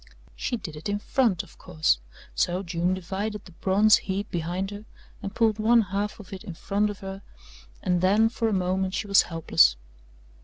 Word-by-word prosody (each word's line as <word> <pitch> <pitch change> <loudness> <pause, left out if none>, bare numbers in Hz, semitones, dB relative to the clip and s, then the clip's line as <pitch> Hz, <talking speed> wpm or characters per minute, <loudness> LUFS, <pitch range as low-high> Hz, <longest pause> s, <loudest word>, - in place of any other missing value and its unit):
She 245 - -2
did 165 -8 -8
it 150 +5 -6
in 205 - 0
front, 210 -4 +1
of - - -18
course, 155 - +1 0.3
so 175 - 0
June 175 +1 0
divided 200 +3 -4
the 185 - -13
bronze 200 +5 +4
heap 200 +1 -4
behind 175 +3 -2
her 205 +1 -8 0.4
and 200 +1 -6
pulled 220 -2 +2
one 230 +2 +5
half 200 +1 -3
of 205 -2 -11
it 190 - -7
in 180 -6 -7
front 205 +4 0
of 205 - -7
her 195 0 -6 0.6
and 180 -1 +1
then 205 +4 +4
for 230 0 -1
a - - 0
moment 185 0 0
she - - -2
was 200 -1 +6
helpless. 165 - +3
195 Hz, 190 wpm, -26 LUFS, 180-210 Hz, 0.6 s, was